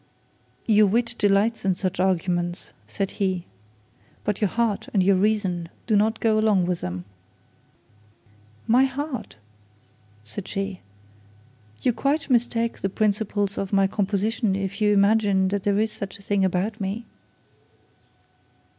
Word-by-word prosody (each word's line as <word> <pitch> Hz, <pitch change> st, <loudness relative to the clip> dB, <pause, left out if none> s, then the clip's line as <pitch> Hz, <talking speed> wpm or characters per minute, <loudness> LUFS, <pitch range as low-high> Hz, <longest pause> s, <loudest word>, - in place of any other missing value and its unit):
'Your 215 Hz, -2 st, +5 dB
wit 230 Hz, +4 st, +1 dB
delights 205 Hz, +2 st, +2 dB
in 190 Hz, -2 st, +2 dB
such 185 Hz, -1 st, -3 dB
arguments,' 175 Hz, -1 st, 0 dB, 0.2 s
said 195 Hz, -2 st, -3 dB
he, 185 Hz, -3 st, 0 dB, 0.8 s
'but 210 Hz, 0 st, -2 dB
your 210 Hz, -, +4 dB
heart 225 Hz, 0 st, -1 dB
and 190 Hz, -, +4 dB
your 195 Hz, +1 st, +4 dB
reason 190 Hz, -4 st, 0 dB, 0.2 s
do 220 Hz, -, +2 dB
not 215 Hz, +2 st, +3 dB
quite -, -, -11 dB
go 220 Hz, -1 st, +3 dB
along 210 Hz, -4 st, +3 dB
with 175 Hz, -1 st, -2 dB
them.' 90 Hz, 0 st, -5 dB, 1.6 s
'My 250 Hz, +4 st, +5 dB
heart!' 270 Hz, 0 st, -5 dB, 0.9 s
said 180 Hz, -, -7 dB
she; 195 Hz, -2 st, -3 dB, 1.0 s
'you 250 Hz, -, +3 dB
quite 285 Hz, +4 st, -1 dB
mistake 235 Hz, -1 st, +1 dB
the 195 Hz, -, -1 dB
principles 205 Hz, 0 st, 0 dB
of 195 Hz, -, -3 dB
my 195 Hz, -1 st, +4 dB
composition 200 Hz, +2 st, 0 dB
if 195 Hz, +1 st, -4 dB
you 210 Hz, 0 st, +4 dB
imagine 200 Hz, -2 st, +3 dB
that 200 Hz, 0 st, -1 dB
there 200 Hz, -1 st, +2 dB
is 220 Hz, +1 st, +1 dB
such 200 Hz, -2 st, -7 dB
a 200 Hz, -, -17 dB
thing 200 Hz, -1 st, +1 dB
about 190 Hz, +4 st, -1 dB
me.' 200 Hz, +4 st, -3 dB
200 Hz, 140 wpm, -24 LUFS, 190-220 Hz, 1.6 s, Your